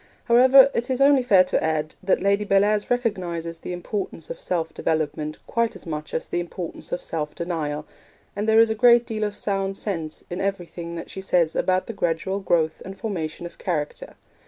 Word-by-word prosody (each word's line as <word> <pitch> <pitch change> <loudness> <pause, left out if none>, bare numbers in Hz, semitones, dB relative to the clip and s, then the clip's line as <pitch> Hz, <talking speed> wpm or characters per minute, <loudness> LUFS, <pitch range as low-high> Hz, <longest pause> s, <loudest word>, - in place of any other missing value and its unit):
However, 260 +3 +7
it 235 +2 -2
is 260 -1 0
only 275 -1 +6
fair 200 -7 +5
to 185 - -1
add 155 -1 -1
that 190 0 +1
Lady 200 +1 +2
Bellairs 205 +1 +2
recognises 175 -9 -2
the - - -6
importance 195 - -5
of - - -7
self 165 -3 -2
development 155 -1 -2
quite 230 -1 0
as - - -11
much 155 -2 -5
as - - -2
the - - -1
importance 175 0 -6
of - - -3
self 150 -2 -4
denial; 155 -4 -3 0.5
and 205 +2 -1
there 220 0 +6
is 225 -1 +5
a - - +2
great 235 +1 +5
deal 220 -2 -3
of 210 -1 -2
sound 195 -1 -2
sense 165 -7 -4
in 175 - -3
everything 175 -3 -4
that 165 - -7
she 190 - -6
says 175 -4 +1
about 185 0 +1
the 230 - -6
gradual 190 +1 -1
growth 165 -4 +1
and 195 +1 -8
formation 175 -6 -4
of 170 - -10
character. 155 -5 -3
185 Hz, 195 wpm, -24 LUFS, 165-215 Hz, 0.5 s, However